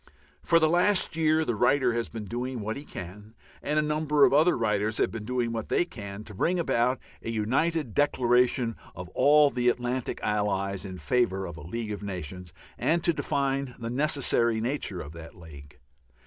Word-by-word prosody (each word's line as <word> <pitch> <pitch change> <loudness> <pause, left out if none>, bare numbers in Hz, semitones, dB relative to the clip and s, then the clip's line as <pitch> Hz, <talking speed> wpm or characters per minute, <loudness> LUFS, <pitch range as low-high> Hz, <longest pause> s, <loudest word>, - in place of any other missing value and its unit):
For 170 - +3
the 160 -1 +4
last 180 +2 +3
year 160 -1 +2
the 120 - 0
writer 125 +3 +2
has 120 0 -2
been 110 -2 -7
doing 125 +4 -4
what 110 +2 -3
he 145 - -8
can 105 +3 -9 0.3
and 150 +1 -1
a 155 - +3
number 150 -1 +3
of 130 - +2
other 155 +5 +4
writers 105 -1 0
have - - +1
been 110 -2 -6
doing 120 -1 -1
what 115 -1 -4
they - - +2
can 100 - -8
to 110 - -11
bring 175 - 0
about 130 -5 +1 0.2
a - - -6
united 130 +5 0
declaration 125 -3 +2 0.2
of 90 0 -8
all 145 +6 +5
the 125 -1 +2
Atlantic 125 +1 -2
Allies 100 -2 -1
in 95 -1 -7
favour 95 - 0
of 85 - -7
a 80 - -10
League 105 +7 -5
of 105 - -5
Nations, 90 -3 -6 0.3
and 170 +1 +1
to 170 -1 +3
define 135 -3 -1
the 115 -1 -5
necessary 125 -5 +1
nature 115 -6 -3
of 75 - -8
that 80 0 -11
League. 75 -3 -13
120 Hz, 190 wpm, -27 LUFS, 105-145 Hz, 0.3 s, all